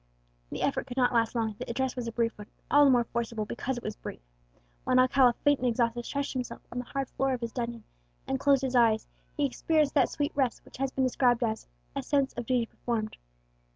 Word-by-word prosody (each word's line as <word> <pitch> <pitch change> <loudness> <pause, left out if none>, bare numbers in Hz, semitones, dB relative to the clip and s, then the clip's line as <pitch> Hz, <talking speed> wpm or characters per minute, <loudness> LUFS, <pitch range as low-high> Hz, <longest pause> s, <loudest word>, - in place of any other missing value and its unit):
The - - -4
effort 275 - 0
could 245 - -7
not 250 -1 +3
last 230 0 +2
long; 220 -2 0
the - - -6
address 260 +2 -1
was 245 -2 -4
a - - -2
brief 230 0 0
one, 210 0 -10
and - - -38
all 290 0 +7
the - - +6
more 245 -2 +5
forcible 230 -2 -3
because 245 +4 -3
it 240 - -7
was 215 - -4
brief. - - -8 0.6
When 255 - +2
Alcala, 255 -1 +5
faint 290 -1 +4
and 255 - 0
exhausted, 235 0 0
stretched 280 0 -2
himself 255 -2 -5
on 245 - -3
the 245 - -4
hard 275 +1 -3
floor 270 0 0
of 250 - -3
his 230 -1 -3
dungeon, 235 -2 -4 0.4
and 265 0 -1
closed 275 -1 +3
his 260 -1 -1
eyes, 225 -3 +4 0.3
he 290 - +2
experienced 300 +2 +1
that 275 -4 +4
sweet 290 0 -1
rest 265 -4 0
which - - -13
has 270 +1 0
been 260 0 -1
described 250 -1 +3
as 220 -1 -2 0.3
"a - - -1
sense 275 -2 +1
of 240 -2 -6
duty 250 -2 +2
performed." 225 -2 -3
245 Hz, 235 wpm, -29 LUFS, 235-270 Hz, 0.6 s, all